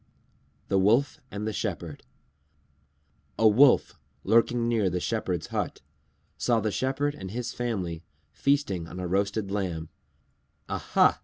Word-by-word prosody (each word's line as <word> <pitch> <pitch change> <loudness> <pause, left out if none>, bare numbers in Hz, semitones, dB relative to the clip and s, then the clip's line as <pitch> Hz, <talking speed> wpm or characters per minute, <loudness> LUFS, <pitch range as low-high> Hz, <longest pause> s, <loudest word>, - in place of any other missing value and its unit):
_ - - -37
THE 95 - +2
WOLF 120 +9 +3
AND 105 +1 -5
THE 110 - -2
SHEPHERD 85 -7 -4 1.4
A 110 - +5
Wolf, 125 +6 +5 0.2
lurking 115 +1 +3
near 110 -5 +2
the 90 0 -1
Shepherd's 90 -5 -2
hut, - - -2 0.6
saw 120 -2 +2
the 110 0 -1
Shepherd 135 +5 0
and 95 -9 -8
his 120 +4 -4
family 95 -9 -3 0.3
feasting 135 - 0
on 90 - -8
a 90 - -3
roasted 100 +2 0
lamb. 90 -6 -2 0.8
"Aha!" - - +2
105 Hz, 135 wpm, -27 LUFS, 95-120 Hz, 1.4 s, A